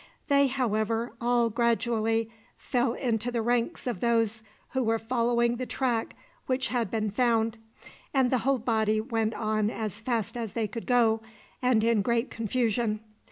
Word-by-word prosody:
They, 280 0 +5
however, 230 -3 -1
all 240 -1 +2
gradually 225 -1 +1 0.3
fell 245 -2 0
into 240 -2 -1
the 235 -2 -1
ranks 240 +6 0
of 240 -7 -2
those 225 -1 +1 0.3
who 260 - 0
were 225 0 +2
following 235 +1 +1
the 255 0 -4
track 240 -4 -1 0.3
which 260 0 0
had 235 -5 0
been 215 -1 -1
found, 225 0 +1 0.5
and 265 -3 +2
the 255 - +3
whole 270 +3 +2
body 220 -2 +1
went 225 -1 -1
on 215 -1 0
as 215 -2 -4
fast 230 -4 -1
as 230 -4 -4
they 225 -2 -1
could 230 +2 -7
go, 230 -3 +3 0.4
and 250 -4 +3
in 230 -2 +3
great 235 +3 0
confusion. 225 -1 0
230 Hz, 160 wpm, -28 LUFS, 220-245 Hz, 0.5 s, They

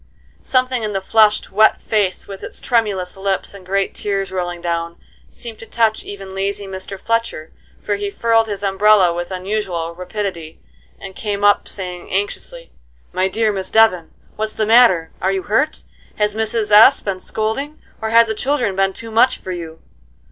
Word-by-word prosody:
Something 255 -1 +1
in 215 -1 -3
the 195 - 0
flushed, 215 +2 +3
wet 215 +3 +4
face, 205 -4 -1
with 195 -1 -9
its - - -8
tremulous 205 -7 0
lips 195 0 -2
and 200 -2 -12
great 195 +1 -1
tears 195 -2 -2
rolling 175 -2 -3
down, 170 0 -3 0.3
seemed 230 -3 -8
to 225 - -11
touch 225 -2 +1
even 195 -1 -8
lazy 200 +1 -2
Mr. 190 0 -7
Fletcher, 230 -8 -2 0.3
for 205 -1 -1
he 205 0 -3
furled 225 +2 +2
his 205 -1 -5
umbrella 195 -2 +4
with 175 0 -4
unusual 185 -3 -3
rapidity, 180 -3 -5 0.4
and 190 -1 -9
came 205 -2 -3
up, 205 0 +4
saying, 180 -2 -5
anxiously: 185 -3 -3 0.4
"My 185 +1 +1
dear 220 +3 +1
Miss 190 -1 -3
Devon, 200 -7 +3 0.3
what's 215 0 -2
the 215 - -1
matter? 215 -8 +5
Are 190 - +1
you 190 -1 -2
hurt? 270 - 0 0.3
Has 210 -1 0
Mrs. 220 0 -2
S. 220 +6 +8
been 195 -2 -3
scolding? 225 +10 -3 0.2
Or 220 - -2
have 230 +1 +6
the 220 - -2
children 245 -4 0
been 195 0 +1
too 230 +2 -6
much 235 +4 +4
for 185 - -7
you?" 165 -2 -7
200 Hz, 175 wpm, -19 LUFS, 185-220 Hz, 0.4 s, S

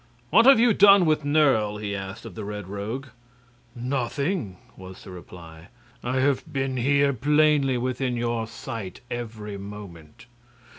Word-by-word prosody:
"What 230 +2 +6
have 270 -4 +8
you 235 -1 +5
done 200 -2 +6
with 155 -1 +1
Nerle?" 135 -8 +2
he 100 -1 -4
asked 95 0 -7
of - - -9
the 110 - -7
Red 105 -2 -6
Rogue. 110 +8 -5 0.7
"Nothing," 125 - -2 0.2
was 95 0 -12
the 95 - -11
reply. 85 -2 -12 0.4
"I 130 +2 -1
have 140 +3 0
been 135 -2 -2
here, 140 +3 +2
plainly 145 0 +2
within 125 0 -2
your 115 -1 -2
sight, 110 -3 -7
every 110 -4 -6
moment." 100 0 -11
120 Hz, 145 wpm, -25 LUFS, 100-140 Hz, 0.7 s, have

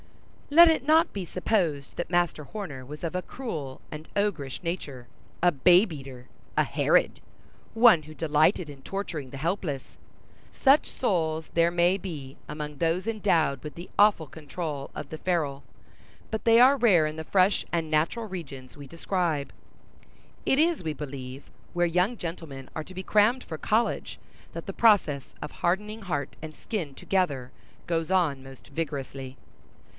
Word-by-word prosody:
Let 335 +4 +9
it 320 -5 +2
not 315 +2 +4
be 195 -3 -4
supposed 170 -6 -1
that 175 - -4
Master 175 -3 +1
Horner 145 -6 -7
was 150 +5 -10
of 165 - -3
a 180 - 0
cruel 160 - -6
and 155 +1 -9
ogrish 175 -10 -1
nature—a 165 0 -3
babe 175 +6 +5
eater—a 130 -3 -5
Herod—one 225 -8 +2
who 155 +1 -11
delighted 155 +2 +2
in 140 -2 -11
torturing 160 -5 -5
the 135 - -8
helpless. 160 -2 -3 0.5
Such 275 +2 +4
souls 160 -8 -1
there 170 0 +4
may 175 +2 +3
be, 150 -9 -7
among 150 0 -6
those 170 +6 0
endowed 190 -10 +1
with 150 - -7
the 175 +2 -9
awful 205 -6 +4
control 150 0 -6
of 140 - -7
the 160 - -7
ferule, 155 -6 -1 0.7
but 220 -1 -3
they 230 0 +6
are 260 +3 +7
rare 200 - +5
in 155 0 -3
the 160 - -5
fresh 190 +3 +3
and 165 -2 -1
natural 160 +10 +1
regions 140 -10 -8
we 145 -1 -10
describe. 165 -2 -2 0.9
It 265 - +3
is, 330 - +2
we 155 -2 -2
believe, 135 -2 -8 0.2
where 175 0 +2
young 180 +8 +1
gentlemen 160 -7 -7
are 155 - -3
to 185 - -13
be 185 - -5
crammed 215 +6 +3
for 160 - -6
college, 220 +8 0 0.3
that - - -7
the - - -5
process 180 - +3
of - - -5
hardening 210 +5 -1
heart 160 -8 -3
and 155 -1 -8
skin 170 -11 -4
together 140 -11 -1 0.3
goes 165 -1 -1
on 165 -8 +1
most 135 +1 -13
vigorously. 135 -3 -5
165 Hz, 155 wpm, -27 LUFS, 145-195 Hz, 0.9 s, Let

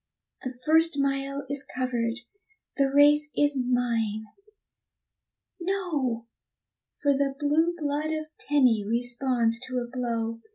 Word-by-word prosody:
The 255 -1 -6
first 320 0 +4
mile 275 0 -1
is 280 0 -1
covered, 245 -2 -2 0.5
the 275 -1 +1
race 295 +2 +5
is 290 -1 +3
mine 240 -4 0 1.4
no! 325 -11 -2 0.8
For 285 -1 +4
the 275 0 0
blue 310 +4 +1
blood 300 0 -2
of 310 -1 -3
Tenny 255 -7 +3
responds 240 +1 +1
to 255 -1 -4
a 245 - -1
blow. 230 -2 -3
270 Hz, 115 wpm, -26 LUFS, 240-290 Hz, 1.4 s, race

